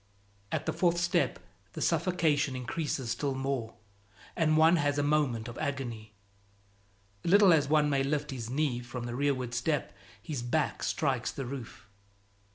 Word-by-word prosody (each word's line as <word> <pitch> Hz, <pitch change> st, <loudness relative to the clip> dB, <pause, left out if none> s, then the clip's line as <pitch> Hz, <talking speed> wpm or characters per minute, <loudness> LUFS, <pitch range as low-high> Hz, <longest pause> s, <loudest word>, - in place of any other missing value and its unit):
At -, -, -2 dB
the -, -, -1 dB
fourth 175 Hz, -1 st, +2 dB
step 175 Hz, 0 st, +1 dB, 0.4 s
the -, -, -6 dB
suffocation 155 Hz, -6 st, +1 dB
increases 130 Hz, -1 st, -3 dB
still 140 Hz, 0 st, -1 dB
more 135 Hz, -4 st, -3 dB, 0.6 s
and 155 Hz, -2 st, +2 dB
one 160 Hz, +2 st, +6 dB
has 145 Hz, -2 st, +1 dB
a 145 Hz, -, +2 dB
moment 145 Hz, -6 st, +1 dB
of 120 Hz, -, -8 dB
agony; 120 Hz, -7 st, -4 dB, 1.1 s
little 195 Hz, 0 st, +6 dB
as 145 Hz, -3 st, +2 dB
one 150 Hz, -1 st, +4 dB
may 140 Hz, -2 st, +2 dB
lift 145 Hz, +2 st, -1 dB
his 120 Hz, -3 st, -5 dB
knee 135 Hz, -2 st, 0 dB
for 125 Hz, +1 st, -7 dB
the 120 Hz, 0 st, -4 dB
rearward 130 Hz, -3 st, 0 dB
step, 140 Hz, +5 st, -1 dB, 0.3 s
his 130 Hz, +5 st, -5 dB
back 125 Hz, +6 st, -1 dB
strikes 130 Hz, -6 st, 0 dB
the 135 Hz, -, -5 dB
roof. 125 Hz, -5 st, -8 dB
140 Hz, 155 wpm, -30 LUFS, 125-155 Hz, 1.1 s, one